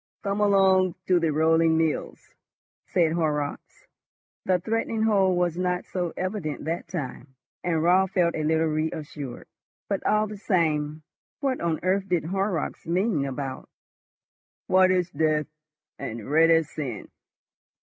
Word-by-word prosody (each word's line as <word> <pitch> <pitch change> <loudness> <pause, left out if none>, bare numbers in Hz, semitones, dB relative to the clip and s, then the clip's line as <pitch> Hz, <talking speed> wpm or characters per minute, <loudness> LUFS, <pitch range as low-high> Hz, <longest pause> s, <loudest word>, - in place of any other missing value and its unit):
"Come 200 0 -1
along 190 -3 +4
to 180 -1 +3
the 165 -1 +1
rolling 160 +1 +3
mills," 160 -2 -2 0.5
said 170 -3 +2
Horrocks. 150 -3 -2 0.6
The 185 -1 +3
threatening 225 +3 -1
hold 195 -4 +3
was 175 -1 0
not 180 0 -1
so 180 -3 -3
evident 185 -7 -3
that 165 +2 -3
time, 135 -5 -6 0.3
and 165 -3 0
Raut 185 +2 +4
felt 175 -3 +2
a 155 - -2
little 160 +1 +2
reassured. 155 -3 -4 0.4
But 200 -2 -2
all 215 0 +2
the 210 -1 -7
same, 155 -6 0 0.4
what 270 -2 -1
on 165 -2 0
earth 190 +1 0
did 175 -3 +1
Horrocks 190 -2 -2
mean 175 -3 +1
about 135 0 -5 1.0
"white 185 0 +4
as 180 -2 +1
death" 155 0 +1 0.5
and 110 -1 -6
"red 160 +2 +5
as 165 -2 +3
sin?" 125 -9 -5
170 Hz, 140 wpm, -26 LUFS, 155-190 Hz, 1.0 s, red